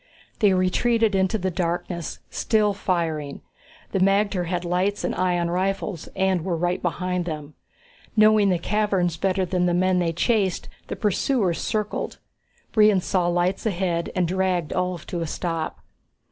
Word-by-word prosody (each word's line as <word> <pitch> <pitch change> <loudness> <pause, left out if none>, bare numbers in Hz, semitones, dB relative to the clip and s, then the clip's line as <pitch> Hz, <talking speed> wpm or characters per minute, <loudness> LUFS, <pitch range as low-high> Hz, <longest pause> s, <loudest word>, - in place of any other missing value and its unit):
They 205 -3 +5
retreated 215 +4 +2
into 190 +2 +2
the 185 -2 -2
darkness, 175 -1 -3
still 210 -2 +2
firing. 165 -7 -2 0.5
The 195 - 0
magter 195 -1 +2
had 175 0 -2
lights 185 +4 0
and - - -1
ion 175 -2 0
rifles, 190 -1 -2
and 190 -3 +1
were 175 -2 -1
right 175 +2 -1
behind 180 0 -1
them. 150 -3 -6 0.6
Knowing 215 -2 +5
the 180 - +2
caverns 195 -2 0
better 190 +2 0
than 180 0 0
the 175 - +2
men 185 0 +2
they 170 -2 +1
chased, 195 +1 0 0.2
the - - -4
pursuers 205 -2 +1
circled. 210 -1 -2 0.6
Brion 210 -3 +5
saw 180 -1 0
lights 175 +4 0
ahead 175 -4 -1
and 180 -2 +2
dragged 185 -3 0
Ulv 180 -2 -2
to 175 - -4
a 165 - -2
stop. 165 0 -3
185 Hz, 150 wpm, -24 LUFS, 175-195 Hz, 0.6 s, They